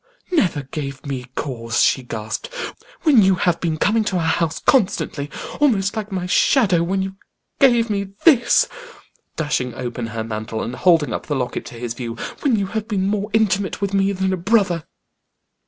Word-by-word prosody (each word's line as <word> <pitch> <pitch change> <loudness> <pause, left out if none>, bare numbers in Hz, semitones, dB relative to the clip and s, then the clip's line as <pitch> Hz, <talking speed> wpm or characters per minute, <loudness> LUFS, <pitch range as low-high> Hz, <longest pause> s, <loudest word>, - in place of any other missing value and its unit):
"Never 180 - +1
gave 140 0 -6
me 135 -3 -4
cause!" 120 -4 -1
she 135 - +3
gasped. 115 - -5 0.5
"When 285 -9 +6
you 190 -1 +4
have 175 -1 +1
been 160 -3 -1
coming 220 +6 +2
to 195 - -1
our 175 - +1
house 160 0 +1
constantly, 160 - +1 0.3
almost 215 -9 +2
like 215 -1 -4
my 185 -2 -2
shadow; 190 - +3
when 190 +3 0
you 190 0 -6 0.4
gave 240 -4 +5
me 200 -1 -1 0.2
this" 265 -8 +5 0.7
dashing 130 -6 -1
open 120 -1 -4
her 115 0 -4
mantle, 110 0 -4
and 120 - -4
holding 165 -5 +3
up - - -5
the 145 - -1
locket 125 -2 -3
to - - -10
his 115 0 -4
view; 120 -1 -5 0.2
"when 275 -6 +2
you 200 -2 0
have 220 +2 -4
been 200 -4 0
more 205 +1 -1
intimate 200 -3 +1
with 200 0 -2
me 195 0 +2
than 190 -1 0
a - - -1
brother." 180 -3 +1
185 Hz, 180 wpm, -21 LUFS, 135-205 Hz, 0.7 s, When